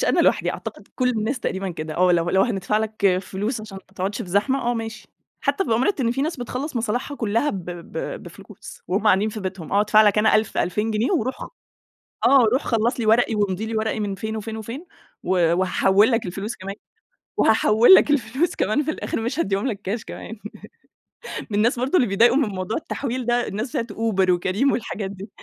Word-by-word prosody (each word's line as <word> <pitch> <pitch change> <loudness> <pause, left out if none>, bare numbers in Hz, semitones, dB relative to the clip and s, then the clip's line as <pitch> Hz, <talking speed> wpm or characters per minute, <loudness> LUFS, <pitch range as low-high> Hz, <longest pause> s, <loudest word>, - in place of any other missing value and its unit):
مش - - +1
أنا - - +3
لوحدي - - +2
أعتقد - - -8
كل 255 -1 +1
الناس 235 +3 -2
تقريبًا 190 -3 -2
كده، 155 -1 -6
آه، 180 0 +4
لو 170 0 +1
لو 190 0 +4
هندفع 210 -2 0
لك 205 -4 +1
فلوس 210 +5 -3
عشان 210 -3 -9
ما 195 - -26
تقعدش 195 +2 -3
في - - -10
زحمة، 210 +9 +1
آه - - 0
ماشي، 225 -2 -6 0.3
حتى 285 +8 0
بأمارة 250 - +1
إن 235 -2 +1
في 270 +3 -1
ناس 320 +1 -2
بتخلّص 255 +3 -5
مصالحها 240 +5 -2
كلها 230 +5 0
ب 190 -3 -5
ب 175 - -6
بفلوس - - -12
وهُم 195 +4 0
قاعدين 205 +1 +4
في 215 0 -6
بيتهم. 185 -4 -6
آه، 200 - +4
أدفع 215 +1 +5
لك 210 0 +3
أنا 220 +1 +4
1000، 215 0 +1
2000 210 +5 0
جنيه 220 - 0
وروح 260 -6 0
خ - - -7 0.8
آه، 270 -3 +6
روح 260 - +2
خلص 235 +2 0
لي 225 - -1
ورقي 225 +1 +3
وامضِ 205 -1 -1
لي 220 0 -3
ورقي 220 0 -1
من 205 -2 -2
فين 220 +2 -4
وفين 220 +1 -5
وفين، 235 - -7 0.4
و - - -5 0.3
وهاحوِّل 195 +4 +3
لك 230 -3 0
الفلوس 195 +5 -5
كمان، 195 +1 -6 0.6
وهاحوِّل 220 - +6
لك 300 - +5
الفلوس 275 +5 0
كمان 215 +9 +1
في 310 - -2
الآخر 305 - -3
مش 240 +6 -3
هاديهم 195 -3 0
لك 220 -6 -3
كاش 215 +4 -3
كمان. 225 - -8 1.1
من 205 - -1
الناس 235 +3 +2
برضه 260 +8 0
اللي 250 -7 +3
بيتضايقوا 230 +7 +4
من 265 -8 +1
موضوع 185 +2 -3
التحويل 255 -5 -4
ده، 240 0 +1
الناس 215 +6 -3
بتاعة 230 - -2
Uber 195 -5 +1
وCareem 185 +9 +2
والحاجات 205 -4 -3
دي. 195 +2 -9
220 Hz, 210 wpm, -23 LUFS, 195-245 Hz, 1.1 s, آه